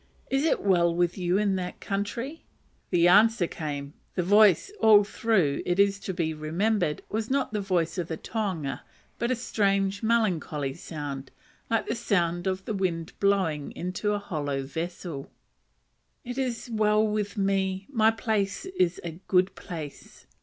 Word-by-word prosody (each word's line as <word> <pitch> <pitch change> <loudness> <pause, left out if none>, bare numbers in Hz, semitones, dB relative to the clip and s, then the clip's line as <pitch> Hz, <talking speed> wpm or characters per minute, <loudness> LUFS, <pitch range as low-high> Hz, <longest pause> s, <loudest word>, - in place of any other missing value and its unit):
is 270 +1 +2
it 325 - +1
well 175 -4 +4
with 175 0 +1
you 180 0 +1
in 200 -2 +2
that 180 -1 -5
country?" 230 +10 -4 0.5
The 175 0 +4
answer 210 +2 +5
came 145 -3 -5 0.2
(the 180 - +1
voice 205 - +5
all 210 -2 +7
through, 200 -8 +1
it 175 0 0
is 200 0 +3
to 195 - -4
be 165 -3 -1
remembered, 165 +2 0
was 220 +1 -3
not 270 -4 0
the 210 - 0
voice 180 -2 0
of 170 - -2
the 160 - -4
tohunga, 185 -12 -3 0.4
but 235 - 0
a 255 - +2
strange 200 -4 0
melancholy 180 - 0
sound, 145 -4 -6 0.4
like 225 -1 +1
the - - -1
sound 175 -6 0
of 190 0 -2
the 220 - -2
wind 175 -4 -2
blowing 185 -8 +1
into 185 +4 -2
a - - +1
hollow 145 -8 -3
vessel,) 160 0 -5 1.0
"It 245 +2 -4
is 250 -3 -2
well 215 -1 +2
with 210 0 -2
me: 195 -1 0
my 220 -5 +3
place 215 - -1
is 185 - 0
a 165 0 -6
good 185 0 +3
place." 155 -5 -9
195 Hz, 160 wpm, -27 LUFS, 170-215 Hz, 1.0 s, all